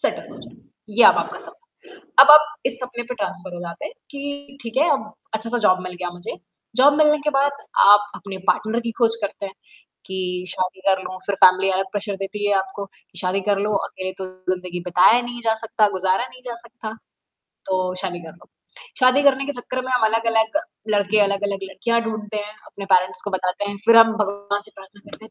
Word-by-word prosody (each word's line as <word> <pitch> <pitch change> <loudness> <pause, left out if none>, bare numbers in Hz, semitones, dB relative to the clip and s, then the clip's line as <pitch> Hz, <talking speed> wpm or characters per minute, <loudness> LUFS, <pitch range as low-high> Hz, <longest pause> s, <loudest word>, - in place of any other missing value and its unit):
settle - - -2
हो - - -13
जाऊँ - - -15 0.4
ये - - +8
अब - - +9
आपका - - -3
सपना, 475 - -10 0.4
अब 290 - +8
आप 300 0 +7
इस 240 - 0
सपने 245 -1 -5
पे 250 +1 -6
ट्रांसफर 190 -5 -5
हो 175 - -7
जाते 170 -1 -7
हैं - - -7 0.2
कि 285 -1 -7
ठीक 230 +1 -6
है 315 +4 +4
अब 215 -6 -4 0.2
अच्छा-सा 230 +2 0
जॉब 185 0 +3
मिल 180 0 -6
गया 175 - -2
मुझे 175 0 -8 0.4
जॉब 275 +4 +6
मिलने 300 -1 +4
के - - +3
बाद 285 +1 +2 0.4
आप 205 0 +6
अपने 195 -1 -8
पार्टनर 220 +2 +1
की - - -1
ख़ोज़ 230 -1 +3
करते 200 0 -4
हैं 195 - -8 0.5
कि 185 -1 -4
शादी 185 0 -3
कर 190 -1 +3
लूँ 185 - -7
फिर 200 - -1
फैमिली 185 +1 +5
अलग 190 +1 0
प्रेशर 205 0 -3
देती 195 +2 -6
है 205 - +2
आपको 190 +1 -2
कि 195 - -16
शादी 185 +1 0
कर 205 -1 +1
लो 210 +1 -1
अकेले 185 0 -6
तो 190 - -5 0.2
ज़िंदगी 180 -1 -3
बताया 180 +7 +5
नहीं 240 0 -7
जा 225 -1 +2
सकता, 220 -1 +1
गुज़ारा 190 +3 0
नहीं 255 0 -15
जा 240 - -5
सकता, 235 -1 -9 0.8
तो 185 -1 -1
शादी 180 -2 -4
कर 165 - -10
लो, 170 - -21 0.5
शादी 255 +2 +5
करने 275 -1 +4
के 285 - -2
चक्कर 255 +1 -4
में 260 - -4
हम 250 -3 +3
अलग-अलग 225 +2 +1 0.4
लड़के 205 +1 +2
अलग-अलग 200 0 0
लड़कियाँ 230 +5 -1
ढूँढ़ते 215 -1 -5
हैं, 210 0 -5
अपने 200 - -9
पैरेंट्स 185 0 +2
को 205 - -4
बताते 190 +1 -2
हैं 205 - -6
फिर 230 - +6
हम 225 0 +8
भगवान 200 0 -3
से - - -7
प्रार्थना 195 +1 -15
करते 220 - -12
हैं, 220 - -14
205 Hz, 215 wpm, -21 LUFS, 190-235 Hz, 0.8 s, अब